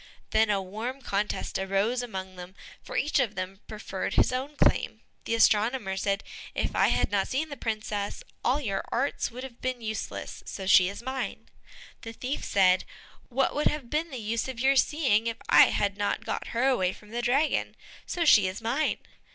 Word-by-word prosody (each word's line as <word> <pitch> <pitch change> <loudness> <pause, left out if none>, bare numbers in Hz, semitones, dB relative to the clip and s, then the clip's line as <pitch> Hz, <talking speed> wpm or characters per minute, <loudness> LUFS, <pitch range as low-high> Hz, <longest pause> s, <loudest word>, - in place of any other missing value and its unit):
Then 220 0 +4
a 200 -2 +1
warm 230 +8 -5
contest 205 -3 -2
arose 195 +6 0
among 190 -6 -6
them, 180 +1 -10 0.3
for - - -6
each 295 - +2
of 230 -5 0
them 185 +1 -5
preferred 210 -3 -4
his - - +4
own 270 +4 -3
claim. - - +2 0.2
The 230 - 0
astronomer 220 -2 +3
said, 195 +1 -1 0.3
"If - - -1
I - - +4
had - - +1
not 200 -2 +1
seen 305 +4 -1
the 285 - -6
princess, 215 -4 -3 0.2
all 260 +4 +2
your 200 -9 -2
arts 270 +4 0
would 250 +2 -8
have 250 -3 -10
been 255 -1 -2
useless, 220 -1 -5
so 195 - -5
she 185 -1 +6
is 200 +4 -8
mine." 260 +1 -4 0.5
The 225 - -7
thief 255 +5 -4
said, 185 -2 +4 0.5
"What 265 +1 +1
would 295 - +2
have 285 -6 -3
been 315 +3 0
the 265 - -6
use 230 +1 -2
of 260 -3 -6
your 270 +2 +4
seeing, 260 -6 +2
if 230 -1 -2
I - - +9
had 200 -1 0
not 205 - -1
got - - -3
her 240 +3 +1
away 190 -9 +2
from 210 0 -16
the 240 +1 -2
dragon? 275 +6 +1 0.3
so 345 -2 -1
she 210 -10 +7
is 185 +2 -4
mine." 240 +7 0
225 Hz, 190 wpm, -28 LUFS, 200-260 Hz, 0.5 s, I